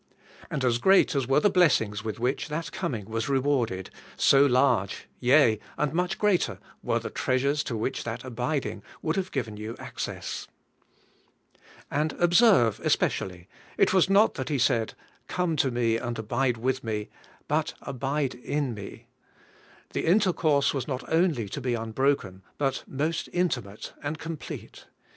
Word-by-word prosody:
And 135 -4 -1
as 120 -1 +2
great 195 +7 +5
as 135 -4 0
were 135 +2 +4
the 205 - +4
blessings 110 - +3
with 110 0 -4
which 125 +3 -1
that 155 +1 -4
coming 110 -6 -3
was 115 +4 -3
re 135 - +3
warded, 125 -9 0 0.3
so 140 0 +6
large, 125 -7 +2
yea, 125 -4 +5 0.2
and 150 -1 0
much 180 +2 0
greater, 205 -4 +1 0.2
were - - 0
the - - -5
treasures 140 +3 +1
to 115 - -3
which 110 +5 -2
that 115 -1 -5
abiding 125 -1 -3 0.2
would 160 +1 0
have 185 -1 -1
given 115 -6 -3
you 110 +2 -6
access. - - -5 1.4
And 150 +1 0
observe 175 - +4
especially, 90 -1 -1 0.3
it - - +4
was 190 -1 +4
not 200 +3 +5
that 130 -1 -4
He 145 - +1
said, 120 -3 +1 0.3
*Oome 180 -3 0
to 135 - +3
me 120 -2 +1
and 120 0 -4
abide 120 +3 0
with 130 +3 -1
me,' 105 -2 -3 0.4
but, - - 0
'Abide 135 +1 -2
in 140 +1 -2
me.'* 100 -2 -9 0.9
The - - -2
intercourse 165 -7 +3
was 135 -3 -3
not 130 -2 -4
only 160 - +2
to 140 - -5
be 125 -2 0
unbroken, 115 -4 -1 0.2
but 135 -2 -1
most 155 +4 -2
intimate 125 - -2
and 150 +2 -3
complete. 160 -1 -8
135 Hz, 155 wpm, -27 LUFS, 115-155 Hz, 1.4 s, so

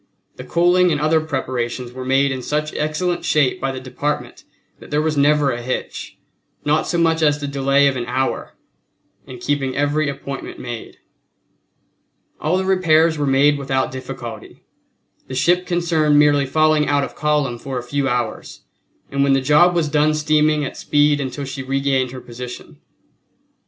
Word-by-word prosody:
The - - -7
coaling 175 +1 +3
and 150 - 0
other 155 +1 +2
preparations 125 -4 -3
were 130 +1 -7
made 135 +2 +2
in 130 -1 -3
such 150 +3 -2
excellent 170 +4 -1
shape 145 -4 +1
by 135 - -1
the 130 - -6
Department 130 +3 -4 0.4
that - - -13
there 150 - 0
was 155 0 0
never 145 0 +3
a 120 - -4
hitch, 130 +2 -5 0.5
not 150 +1 +1
so 175 - -1
much 165 -1 +2
as 150 -1 +3
the 145 - -4
delay 140 0 +2
of 140 -1 +2
an 120 -2 -4
hour, 130 +2 -2 0.7
in 130 - -9
keeping 135 +1 -2
every 145 +1 +1
appointment 140 -1 -7
made. 120 -2 -7 1.4
All 160 +4 0
the 190 - -1
repairs 165 -4 +3
were 145 - 0
made 140 +2 +3
without 135 -1 -1
difficulty, 130 -3 -8 0.6
the 130 - -6
ship 175 +7 +2
concerned 160 -4 +2
merely 145 -2 +4
falling 155 +1 +2
out 145 -1 +2
of - - -5
column 150 -5 0
for 135 0 -5
a 125 - -4
few 135 +2 -1
hours, 120 -2 -3 0.5
and 140 - 0
when 140 -1 +3
the 135 - +3
job 150 +6 +4
was 165 -3 +1
done 150 +1 +2
steaming 155 -1 +2
at - - -6
speed 145 0 +2
until 135 +1 -4
she 135 0 -6
regained 135 -1 0
her 130 0 -9
position. 125 +1 -9
145 Hz, 170 wpm, -20 LUFS, 130-155 Hz, 1.4 s, merely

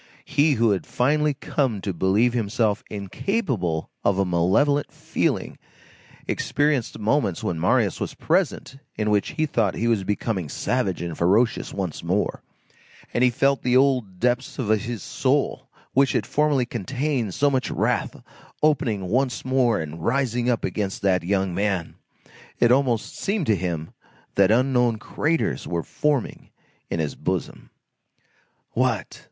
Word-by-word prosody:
He, 145 +1 +3
who 115 -3 +3
had 95 - -1
finally 150 +3 +1
come 130 -7 -1
to 95 - -3
believe 100 +8 +2
himself 110 -2 0
incapable 100 - -2
of 100 - +2
a 100 - +2
malevolent 95 - +2
feeling, - - -2 0.7
experienced 140 -2 0
moments 105 - 0
when 85 - -2
Marius 90 - +2
was - - -4
present, 135 - 0 0.2
in 105 0 0
which 105 -1 +1
he 155 - +1
thought 110 -9 0
he 115 - -1
was 110 -4 +2
becoming 100 -4 -2
savage 100 - -1
and 85 -2 -4
ferocious 105 +9 +2
once 95 -6 -4
more, 95 +5 -1 0.7
and 120 - +2
he 125 - +6
felt 135 +3 +1
the 125 0 +3
old 125 -9 +2
depths 125 +2 0
of 125 -7 -2
his 110 0 0
soul, - - 0 0.2
which 135 0 +3
had - - 0
formerly 150 -4 +2
contained 125 -1 -2
so 145 0 +3
much 130 -3 0
wrath, - - -1 0.4
opening 115 -11 +1
once 125 +6 0
more 130 -5 +2
and 80 +1 -6
rising 125 -1 +1
up 120 - 0
against 100 -3 -3
that 95 -2 +3
young 95 0 0
man. 95 -2 -1 0.7
It 120 - +5
almost 125 -4 +1
seemed 200 -4 -1
to 110 - +3
him 85 -4 -3 0.4
that 100 -1 +4
unknown 125 0 +3
craters 155 +9 -1
were 85 -2 -2
forming 145 -5 -2 0.4
in 85 - -2
his 75 -3 -1
bosom. - - -4 1.0
What! - - -1
115 Hz, 145 wpm, -24 LUFS, 95-135 Hz, 1.0 s, he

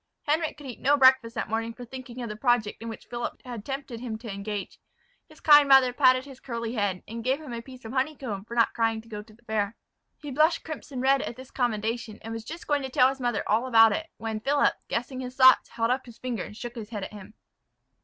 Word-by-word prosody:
Henric 315 +2 +1
could 295 - -11
eat 250 -3 -7
no 285 +2 +3
breakfast 260 -3 +5
that 225 - -2
morning 225 +1 -2
for 245 - -9
thinking 255 0 -8
of - - -4
the 210 - -5
project 230 -3 +1
in 230 - -5
which 225 - -9
Philip 240 -1 -5
had 240 -4 -6
tempted 270 -2 -5
him 230 -3 -4
to 220 -2 -7
engage. 200 0 -5 0.5
His 310 - -17
kind 295 -2 +7
mother 265 -2 +7
patted 255 0 +4
his 270 -2 -12
curly 235 -2 -4
head, 205 -5 -1
and 230 +1 -6
gave 260 +4 +1
him 295 -6 -8
a 230 - -4
piece 255 0 -13
of 225 - -6
honeycomb 260 -7 -2
for 235 - -8
not 230 -1 +3
crying 225 -1 0
to 225 - -21
go 210 -2 -6
to 215 +1 -17
the 240 - -27
fair. 215 -1 -1 0.4
He 295 -1 -8
blushed 310 +5 +3
crimson 285 -4 -6
red 270 +1 +4
at 240 - -5
this 260 +1 -12
commendation, 225 -2 -2
and 225 - -5
was 225 -1 -5
just 330 +8 -8
going 290 -1 +1
to 265 - -4
tell 255 0 +5
his 270 0 -6
mother 240 -4 0
all 225 +5 +2
about 225 -2 +7
it, 320 0 -2
when 220 -1 -3
Philip, 285 +5 +2
guessing 250 +2 -3
his 250 0 -6
thoughts, 260 -1 +6
held 230 +1 0
up 260 0 -1
his 235 - -12
finger, 245 -5 -3
and 210 - -11
shook 240 0 -6
his 225 -4 -8
head 210 -4 -5
at - - -7
him. 210 +1 -11
240 Hz, 250 wpm, -27 LUFS, 225-265 Hz, 0.5 s, kind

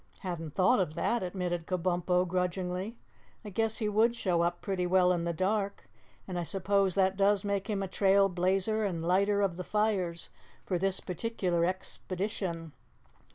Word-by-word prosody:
"Hadn't 165 -5 -5
thought 195 +6 +4
of 155 -5 -1
that," 235 - 0
admitted 180 -2 -3
Kabumpo 180 0 +1
grudgingly. 180 +4 -2 0.5
"I 210 - -6
guess 225 +2 0
he 215 - -1
would 220 +3 +3
show 180 -7 +1
up 175 0 0
pretty 185 -3 -2
well 180 0 +4
in 170 -1 -1
the 170 - 0
dark, 200 +4 -1 0.4
and 180 -2 -3
I - - -1
suppose 195 +1 +1
that 190 -1 +3
does 200 0 +3
make 200 0 -2
him 195 -2 -1
trail 195 +1 +4
blazer 195 +4 +1
and 170 -5 -2
lighter 200 +3 +3
of 180 -4 0
the 180 - -4
fires 195 -5 0 0.3
for 180 -3 -1
this 195 0 +1
particular 180 -3 -1
expedition. 185 -2 -3
185 Hz, 160 wpm, -30 LUFS, 180-200 Hz, 0.5 s, thought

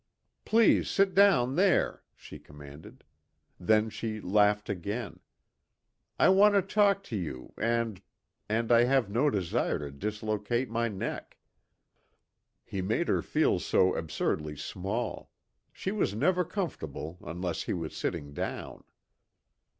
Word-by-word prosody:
"Please 225 0 +4
sit 195 -1 +2
down 135 -11 +4
there," 185 0 +2
she - - -12
commanded. 75 +1 -13 0.6
Then 110 +4 +2
she 110 -1 -4
laughed 105 +1 +2
again. 100 +3 -4 1.0
"I - - +5
want 205 +2 +6
to 200 - +4
talk 200 0 +2
to 120 - -6
you, 75 -10 -5
and 115 -3 -1 0.5
and 115 +2 0
I 120 0 +6
have 125 -5 +1
no 130 +7 +2
desire 95 -9 -1
to 70 -1 -6
dislocate 105 - -2
my 115 0 0
neck." 100 -4 -5 1.3
He 95 - -4
made 110 - -1
her - - +2
feel 155 - +1
so 95 +1 +2
absurdly 75 -1 -2
small; 95 +10 -4 0.4
she 190 - -4
was 195 - -1
never 180 +10 +2
comfortable 90 - -5
unless 90 0 -4
he - - -2
was 80 -3 -5
sitting 70 -1 -4
down. - - -5
110 Hz, 125 wpm, -29 LUFS, 90-145 Hz, 1.3 s, want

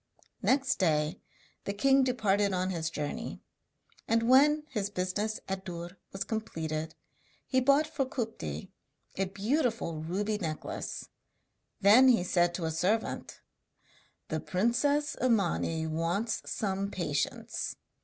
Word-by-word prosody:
Next 265 0 +2
day 155 -1 +1 0.4
the 200 - -2
king 270 +5 +4
departed 205 -6 +2
on 185 +1 0
his 165 -3 -2
journey, 165 +9 -4 0.7
and 230 0 +3
when 295 +4 +6
his 205 -5 -1
business 205 +3 -2
at 190 0 -3
Dûr 175 -1 -6 0.2
was 195 0 -3
completed 160 -8 -3 0.5
he 260 - +2
bought 280 +4 +4
for 285 -3 -2
Kupti 220 - -4 0.4
a 195 - +1
beautiful 210 - -1
ruby 205 +6 -1
necklace. 160 -5 -4 0.7
Then 220 +7 +8
he 240 -8 +5
said 175 -1 +2
to 170 - -3
a 160 - 0
servant: 190 +8 -1 0.9
'The 155 - -1
princess 280 - +1
Imani 175 -8 +1
wants 170 +8 -1
some 195 -2 -1
patience. 150 -7 -2
200 Hz, 120 wpm, -30 LUFS, 170-235 Hz, 0.9 s, Then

